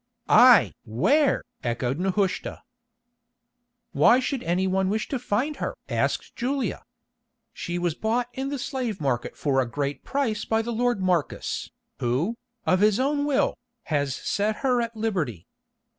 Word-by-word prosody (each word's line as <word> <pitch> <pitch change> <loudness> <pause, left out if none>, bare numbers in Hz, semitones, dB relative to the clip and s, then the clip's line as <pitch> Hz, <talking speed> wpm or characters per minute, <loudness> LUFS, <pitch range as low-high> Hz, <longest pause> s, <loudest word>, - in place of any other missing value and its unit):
"Aye! 245 +2 +7
where?" 265 - +2 0.2
echoed 120 +4 -1
Nehushta. 190 +1 -1 1.3
"Why 245 - +5
should 260 0 -2
any 180 0 0
one 190 0 +1
wish 215 +2 -1
to 270 - -2
find 250 +6 -1
her?" - - -3
asked - - -1
Julia. 265 +2 -2 0.7
"She 175 0 -4
was 175 -2 0
bought 230 +7 -1
in 270 +1 -3
the 285 - -3
slave 245 -6 -3
market 130 -4 -2
for 135 -3 +1
a 125 - -3
great 140 +2 -3
price 235 -7 -1
by 225 0 0
the 235 - -3
lord 240 -2 +1
Marcus, 180 -5 -1 0.3
who, 130 - 0 0.3
of 185 - +3
his 210 +1 +4
own 285 +2 +1
will, 290 -2 +2 0.4
has 140 -2 +1
set 210 +7 -1
her 250 -2 +3
at 230 0 -4
liberty. 165 - -2
210 Hz, 145 wpm, -25 LUFS, 160-245 Hz, 1.3 s, Aye